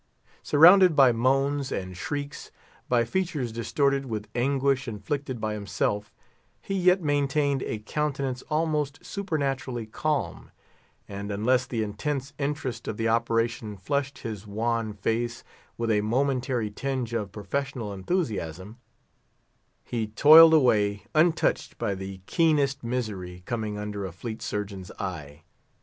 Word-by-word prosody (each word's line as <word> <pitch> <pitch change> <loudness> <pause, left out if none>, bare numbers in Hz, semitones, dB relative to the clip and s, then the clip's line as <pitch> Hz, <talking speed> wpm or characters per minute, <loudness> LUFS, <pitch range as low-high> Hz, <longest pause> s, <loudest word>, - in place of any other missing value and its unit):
Surrounded 175 +3 +7
by 135 -3 +7
moans 135 +4 +1
and 95 -1 -4
shrieks, 145 +9 -5 0.4
by 120 -2 +3
features 155 -4 -2
distorted 135 +4 0
with 105 -3 -4
anguish 135 +2 +1
inflicted 125 +5 -4
by 110 0 -2
himself, 105 0 -2 0.5
he 195 - -5
yet 185 -1 +3
maintained 145 -1 +1
a 110 - -2
countenance 135 +2 -2
almost 150 -2 0
supernaturally 135 - -2
calm; 150 +6 -2 0.6
and 100 0 -6
unless 125 +5 +1
the 115 -3 -1
intense 135 +7 -3
interest 140 -4 -3
of 105 - -3
the 115 - 0
operation 115 -2 0
flushed 140 +8 -2
his 105 -2 -5
wan 115 +1 -1
face 115 +3 -2 0.3
with 115 -1 0
a 105 -1 +3
momentary 125 -1 0
tinge 130 0 -3
of 105 -4 -2
professional 120 0 -4
enthusiasm, 100 - -3 1.1
he 115 -2 -3
toiled 160 +8 +8
away, 105 -8 +3
untouched 160 +1 +2
by 100 - -1
the 95 0 -7
keenest 145 - +2
misery 100 -7 -4
coming 110 -3 -3
under 105 -1 -4
a - - -8
fleet 110 +5 -7
surgeon's 100 -3 -4
eye. 75 -7 -6
120 Hz, 125 wpm, -26 LUFS, 105-140 Hz, 1.1 s, toiled